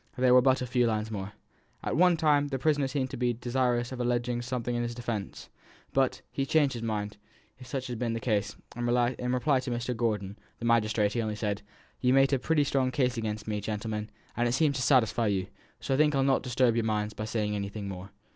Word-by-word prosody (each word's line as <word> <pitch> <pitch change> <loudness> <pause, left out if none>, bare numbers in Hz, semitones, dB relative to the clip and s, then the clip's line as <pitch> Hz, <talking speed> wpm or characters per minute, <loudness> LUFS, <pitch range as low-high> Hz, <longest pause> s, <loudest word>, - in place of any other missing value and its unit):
There 125 0 +4
were 125 - +8
but 130 0 +3
a - - -2
few 125 -1 +2
lines 110 0 -1
more: 100 -1 -5 0.5
"At - - -1
one 175 +2 +5
time 145 -2 +3
the 135 -2 -2
prisoner 145 0 +1
seemed 135 -1 -2
to - - -5
be 120 0 +1
desirous 120 0 0
of 130 - -6
alleging 120 0 0
something 120 0 -3
in 120 - 0
his 120 0 -3
defence, 115 -4 -5 0.5
but 135 -1 +1
he 135 - -1
changed 140 -1 +2
his 120 - -5
mind, 105 -2 -3 0.4
if 125 - -11
such 130 +1 -3
had 120 -3 -5
been 115 -2 -1
the 115 - -2
case, 110 -4 -1 0.2
and 120 0 -2
in 125 0 +1
reply 130 +2 +2
to 130 - -5
Mr. 120 +1 -2
Gordon 105 -3 -2 0.2
(the 120 - -6
magistrate) 110 -2 +2
he 120 - 0
only 110 -1 -2
said, 105 -1 -2 0.4
'You've 125 +1 +3
made 135 +1 +4
a 135 - +3
pretty 150 +3 +2
strong 135 -2 +1
case 130 -3 +1
out - - -9
again 110 -2 -2
me, 105 -1 -2
gentlemen, 105 +1 -3 0.3
and 120 +1 +1
it 120 - 0
seems 140 0 +2
for - - -2
to - - +1
satisfy 120 -4 +3
you; 95 -3 0 0.3
so - - -2
I - - +2
think 150 0 +3
I'll 135 - +3
not 135 0 +3
disturb 125 -2 +2
your 115 - +1
minds 105 -1 -1
by 110 - -5
saying 105 -1 -1
anything 100 0 -4
more.' 95 0 -7
120 Hz, 240 wpm, -29 LUFS, 110-130 Hz, 0.5 s, were